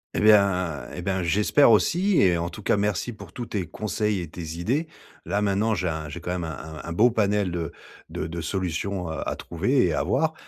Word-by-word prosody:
Et - - +1
bien, 100 -7 +4
et 90 - -5
ben, 95 0 -1
j'espère 105 - +4
aussi 175 - +3
et 90 -3 +4
en 85 +1 -2
tout 105 - -10
cas, 105 - +2
merci 105 +3 -1
pour 100 -4 -12
tous 120 -2 -5
tes 100 -4 -2
conseils 105 +3 -2
et 85 - -5
tes 80 -1 -7
idées. 135 - 0 0.4
Là, 100 - 0
maintenant, 105 +2 +1
j'ai 90 -2 -1
un 80 -1 -4
j'ai 75 +4 -7
quand 90 - -6
même 90 -1 -2
un 80 -1 -7
un 85 - -6
beau 110 +8 +5
panel 105 -4 +1
de 85 -2 -3 0.4
de - - -4
de 85 +1 -5
solutions 90 +2 -2
à 80 - -3
trouver 125 - +1
et - - 0
à - - 0
voir, 155 +4 +1
95 Hz, 220 wpm, -25 LUFS, 85-105 Hz, 0.4 s, beau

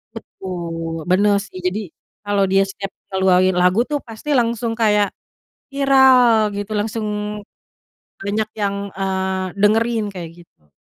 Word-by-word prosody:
Betul, 165 -3 -6 0.2
benar 200 +2 +4
sih. 200 - -11
Jadi 185 +4 0 0.4
kalau 205 -1 +1
dia 195 0 +4
setiap 195 0 -6 0.2
keluarin 185 -1 +3
lagu 180 +3 +3
tuh 295 -1 0
pasti 225 +6 -9
langsung 235 -1 0
kayak 210 -2 +3 0.6
viral 260 -5 +5
gitu. 205 +1 -5
Langsung 215 +1 -2 1.2
banyak 210 +2 -1
yang, 200 -1 0 0.2
eee, 190 -1 -1
dengerin 225 +2 +2
kayak 175 -3 -7
gitu. 75 - -36
205 Hz, 120 wpm, -20 LUFS, 190-225 Hz, 1.2 s, viral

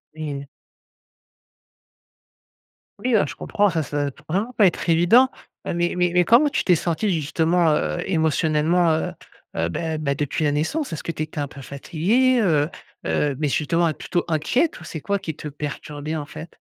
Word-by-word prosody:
Oui. 145 -3 -5 2.5
Oui, 250 0 0
ben, 215 - +4
je - - -7
comprends, 205 0 +1
ça 165 -3 -1
ça 145 - -5
doit 145 - +1
être 140 - -9
vraiment 205 +9 -1
pas 210 - +4
être 175 -1 +1
évident, 180 +11 +5 0.4
heu, - - -1
mais 175 0 0
mais 180 0 +2
mais 180 0 +5
comment 245 - +5
tu 285 - -1
t'es 180 - +4
sentie 170 +5 0
justement, 160 +1 +2
heu, 75 - -1
émotionnellement, 160 0 +2
heu, 160 0 -1 0.4
heu, 80 +1 0
beh 160 - -3
beh, 140 -2 -1
depuis 145 +2 -1
la 145 - +2
naissance, 170 - -1
est-ce 155 - -5
que - - -2
tu 155 - -6
étais 155 0 -4
un 145 - -1
peu 140 - -11
fatiguée, 200 - +1
heu 155 -7 +2 0.4
heu, 145 -2 0
mais 150 0 0
justement, 165 +4 +1
mais 160 - +1
plutôt 175 +3 -2
inquiète 170 - +1
ou - - -10
c'est 160 -1 -7
quoi 200 +4 -1
qui 160 -6 -5
te - - -7
perturbait, 150 +1 -5
en 150 -2 -3
fait? 155 +3 -10
160 Hz, 190 wpm, -23 LUFS, 150-180 Hz, 2.5 s, évident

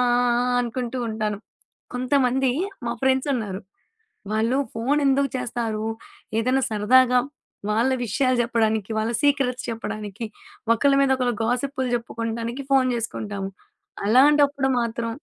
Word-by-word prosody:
ఆ! 245 - +3 0.3
ఆ! - - +3
అనుకుంటూ 245 +1 -3
ఉంటాను. 215 -1 -2 0.6
కొంతమంది 255 0 +2 0.4
మా - - 0
ఫ్రెండ్సున్నారు. 260 -7 0 0.7
వాళ్ళు 225 +4 +1 0.2
ఫోను 255 +6 +1
ఎందుకు 275 +1 +2
చేస్తారు, 230 -3 -3 0.5
ఏదైనా 255 +3 +2
సరదాగా, 250 +4 +4 0.5
వాళ్ళ 225 +5 +2 0.2
విషయాలు 255 +4 +1
చెప్పడానికి, 220 -3 0
వాళ్ళ 220 +2 -1
సీక్రెట్స్ 275 -3 +1
చెప్పడానికి, 215 -1 -5 0.5
ఒకళ్ళ 280 +5 +3
మీద 275 - +3
ఒకళ్ళ 250 -1 0
గాసిప్పులు 255 +2 -1
చెప్పుకుడానికి 230 +2 -4
ఫోను 265 -1 +4
చేసుకుంటాము. 205 -3 -4 0.6
అలాంటప్పుడు 280 +3 +4
మాత్రం 230 0 -2
245 Hz, 110 wpm, -23 LUFS, 225-265 Hz, 0.7 s, సరదాగా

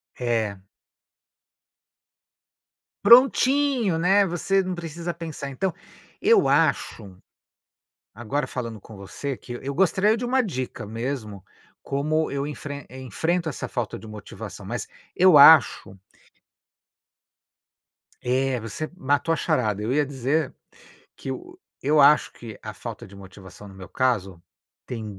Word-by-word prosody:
É. 115 -5 -1 2.5
Prontinho, 255 - +5
né, 195 +4 +4
você 190 +2 0
não 185 0 -4
precisa 170 0 -5
pensar 160 -4 -7
então, 180 +7 -2 0.5
eu - - +4
acho, 95 -2 0 1.0
agora 120 +6 -3
falando 115 -4 -6
com 110 - -13
você, 125 +7 -6
que 120 - -9
eu 140 +1 -4
gostaria 195 +6 +2
de 245 - -4
uma 260 +2 +2
dica 130 - -5
mesmo, 110 -3 -5 0.4
como 155 +3 -1
eu 140 0 -2
enfren 145 -1 -7
enfrento 160 - -2
essa 140 - -5
falta 120 -3 -4
de 110 - -12
motivação, 105 -2 -9
mas - - -5 0.3
eu 180 -4 +6
acho 140 -9 +6 2.2
é, 130 0 0
você 115 +8 -6
matou 145 +2 0
a - - +1
charada, 105 -8 0
eu 115 +5 -1
ia 150 0 +2
dizer 140 +2 -1 0.6
que - - -8
eu 360 - -9 0.2
eu 150 +2 +3
acho 150 +2 +5
que 115 -3 -11
a - - -7
falta - - -8
de 100 - -15
motivação 100 +1 -13
no 100 - -12
meu 95 -1 -11
caso, 100 -9 -1 0.4
tem 115 -3 -6
140 Hz, 125 wpm, -24 LUFS, 115-170 Hz, 2.5 s, eu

